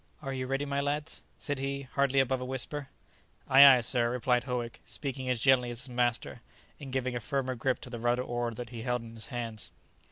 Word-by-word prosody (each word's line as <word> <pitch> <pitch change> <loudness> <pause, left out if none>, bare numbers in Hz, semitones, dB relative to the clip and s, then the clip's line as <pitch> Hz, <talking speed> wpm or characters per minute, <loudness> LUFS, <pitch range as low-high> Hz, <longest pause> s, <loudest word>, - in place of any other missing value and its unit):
"Are 135 -1 -3
you 130 -1 -3
ready, 135 +2 -1
my 140 0 -1
lads?" 145 +2 -2 0.2
said 145 -2 -3
he, 140 0 -2
hardly 140 0 +1
above 130 -1 +1
a - - -3
whisper. 135 +2 -4 0.6
"Ay, 135 +1 +9
ay, 135 -3 +9
sir," 120 0 +2
replied 125 0 +1
Howick, 120 -3 -4
speaking 135 -2 -4
as 125 -2 +1
gently 125 -1 +4
as 120 0 -3
his 130 - -5
master, 120 -1 -1 0.4
and 140 -3 -8
giving 130 -1 -1
a - - -1
firmer 130 +1 -2
grip 125 +1 0
to - - -9
the 120 - -5
rudder 120 +2 +1
oar 120 -1 -2
that 115 0 -7
he 115 -2 -6
held 125 0 -1
in 115 0 -10
his 110 -1 -6
hands. 115 -4 -5
125 Hz, 220 wpm, -30 LUFS, 120-135 Hz, 0.6 s, Ay